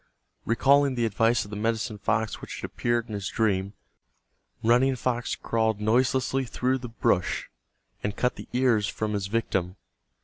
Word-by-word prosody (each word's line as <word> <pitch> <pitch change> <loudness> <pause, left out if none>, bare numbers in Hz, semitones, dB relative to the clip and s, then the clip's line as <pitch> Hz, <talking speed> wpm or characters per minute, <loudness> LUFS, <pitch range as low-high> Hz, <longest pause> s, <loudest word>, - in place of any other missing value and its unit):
Recalling 140 +3 +4
the 120 -1 +1
advice 115 +2 +2
of 105 - -12
the - - -4
medicine 110 0 -1
fox 110 0 -1
which - - -7
had - - -3
appeared 120 -1 0
in 110 - -7
his 100 -2 -3
dream, 100 -3 0 0.9
Running 125 +4 +4
Fox 120 0 -1
crawled 110 -2 0
noiselessly 130 +4 +2
through 130 +2 0
the 120 -1 -7
brush, 115 -5 0 0.5
and 105 - -3
cut 125 - +1
the - - -10
ears 120 -5 +2
from 110 -1 -2
his 100 -2 -1
victim. 95 -4 -1
115 Hz, 160 wpm, -26 LUFS, 105-125 Hz, 0.9 s, Recalling